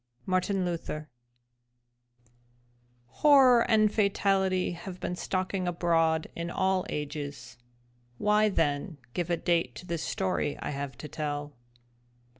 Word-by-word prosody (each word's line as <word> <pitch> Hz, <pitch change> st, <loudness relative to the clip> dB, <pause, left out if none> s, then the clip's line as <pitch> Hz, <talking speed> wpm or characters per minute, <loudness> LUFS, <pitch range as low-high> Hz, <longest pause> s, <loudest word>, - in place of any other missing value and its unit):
—Martin 185 Hz, +1 st, 0 dB
Luther 155 Hz, -3 st, -4 dB, 2.0 s
Horror 255 Hz, -, +5 dB
and 215 Hz, -2 st, +4 dB
fatality 195 Hz, -3 st, +2 dB
have 180 Hz, +1 st, -8 dB
been 180 Hz, -, -3 dB
stalking 185 Hz, 0 st, -2 dB
abroad 165 Hz, -2 st, +2 dB
in 170 Hz, 0 st, -4 dB
all 190 Hz, +1 st, 0 dB
ages. 145 Hz, -3 st, -5 dB, 0.6 s
Why 210 Hz, +1 st, +3 dB
then 150 Hz, -3 st, -1 dB, 0.2 s
give 175 Hz, -1 st, -2 dB
a 170 Hz, -, +1 dB
date 170 Hz, 0 st, 0 dB
to -, -, -9 dB
this 170 Hz, -3 st, -3 dB
story 185 Hz, -5 st, -1 dB
I -, -, -4 dB
have 140 Hz, -3 st, -5 dB
to 150 Hz, -, -7 dB
tell? 145 Hz, -1 st, -4 dB
175 Hz, 115 wpm, -29 LUFS, 155-190 Hz, 2.0 s, Horror